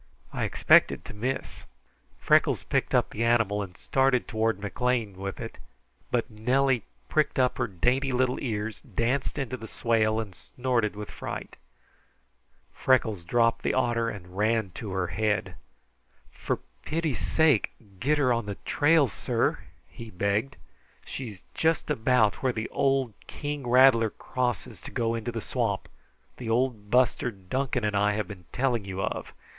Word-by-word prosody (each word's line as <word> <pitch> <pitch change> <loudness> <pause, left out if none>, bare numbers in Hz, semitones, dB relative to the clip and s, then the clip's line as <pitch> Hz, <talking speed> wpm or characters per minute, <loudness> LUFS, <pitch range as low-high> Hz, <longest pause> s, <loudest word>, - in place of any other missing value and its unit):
I - - -1
expected - - +4
to - - -8
miss." 130 +5 -4 0.5
Freckles - - +3
picked - - 0
up - - +2
the 115 - -2
animal 115 -3 +2
and 90 -3 -7
started 135 -2 +2
toward 110 -1 0
McLean 110 0 -1
with 95 +1 -5
it, - - -7 0.5
but 120 -2 0
Nellie 125 +3 +1 0.3
pricked 155 -1 +1
up 130 -1 +2
her 120 - +1
dainty 125 +8 +1
little 125 0 +1
ears, 110 -3 -3
danced 125 +5 -1
into 130 -3 -2
the 110 - -9
swale, 110 -1 +1
and 105 -4 -5
snorted 120 +1 -1
with 105 0 -7
fright. - - -6 1.2
Freckles 110 -8 +2
dropped 115 +5 +2
the - - 0
otter 120 -2 +1
and 90 -4 -9
ran 110 -1 +1
to 105 +4 -7
her 95 -1 0
head. 105 -2 -1 0.8
"For - - -2 0.3
pity's 160 -3 -1
sake, 155 -8 +3 0.3
get 150 +7 +2
her 130 -4 +3
on 115 -3 -2
the 100 - -3
trail, 150 -1 +4
sir," 105 - 0 0.3
he 115 -1 -10
begged. 105 +8 -1 0.5
"She's 110 -8 -7
just 160 -1 +1
about 115 -4 +2
where 130 - +2
the 110 -1 -3
old 135 -4 +1
king 145 -3 -5
rattler 125 -3 +6
crosses 125 -1 -3
to - - -8
go 115 -1 0
into 115 +1 -3
the 115 -1 -4
swamp 115 -6 -1 0.5
the 120 -3 -5
old 115 -3 0
buster 125 +1 +3
Duncan 120 +5 -2
and 105 -1 0
I 105 +1 +3
have 105 0 -2
been 90 -4 -10
telling 125 -4 0
you 95 -1 -6
of. - - -3
115 Hz, 155 wpm, -27 LUFS, 105-130 Hz, 1.2 s, rattler